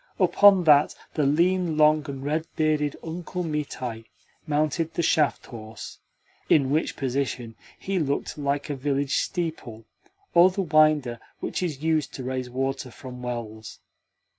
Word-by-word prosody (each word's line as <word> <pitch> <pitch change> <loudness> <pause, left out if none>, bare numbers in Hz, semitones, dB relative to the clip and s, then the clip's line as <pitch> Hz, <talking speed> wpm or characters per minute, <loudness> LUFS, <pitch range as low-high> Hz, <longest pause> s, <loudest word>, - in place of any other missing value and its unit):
Upon 200 -3 +6
that 150 -3 +5 0.2
the 150 -3 +1
lean, 170 +2 +2
long, 155 -1 +4
and 135 -1 -6
red 155 +2 -1
bearded 155 -2 +1
Uncle 175 +2 -5
Mitai 135 -7 -4 0.4
mounted 155 +2 0
the 170 - 0
shaft 150 -2 +2
horse; 110 -2 -10 0.5
in 135 -3 +4
which 155 +3 0
position 130 -3 -3 0.2
he 195 -1 -2
looked 140 -3 -2
like 145 0 -2
a - - -2
village 140 +1 -1
steeple 140 -10 -4 0.5
or 175 +2 +7
the 195 +1 -2
winder 155 -7 +3 0.2
which - - -3
is 155 -5 -3
used 155 -3 0
to 130 - -6
raise 130 0 -3
water 135 +1 -3
from 125 0 -10
wells. 115 -3 -6
145 Hz, 140 wpm, -25 LUFS, 130-160 Hz, 0.5 s, or